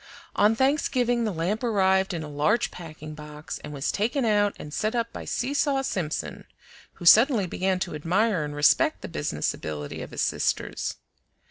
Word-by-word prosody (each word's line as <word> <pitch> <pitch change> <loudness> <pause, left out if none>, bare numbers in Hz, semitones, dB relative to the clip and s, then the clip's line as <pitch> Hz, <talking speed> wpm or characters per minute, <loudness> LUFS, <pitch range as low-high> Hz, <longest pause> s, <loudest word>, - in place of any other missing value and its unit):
On 210 +2 +4
Thanksgiving 250 -3 +1
the 215 - 0
lamp 185 +7 -2
arrived 190 -4 +2
in 165 -3 -4
a - - -6
large 150 +11 +1
packing 155 -3 -9
box, 150 0 -8
and - - -9
was 140 -1 -2
taken 240 +5 0
out 205 -2 +2
and 150 - -9
set 215 +7 -1
up 230 -1 -1
by - - -7
Seesaw 275 +1 0
Simpson, 175 - -3 0.5
who 175 - -10
suddenly 225 - +6
began 185 +1 -1
to 175 - -2
admire 180 +4 +1
and 145 0 -5
respect 145 0 +3
the - - -4
business - - -2
ability 75 -1 -6
of - - -7
his - - -4
sisters. - - -1
190 Hz, 170 wpm, -26 LUFS, 155-230 Hz, 0.5 s, suddenly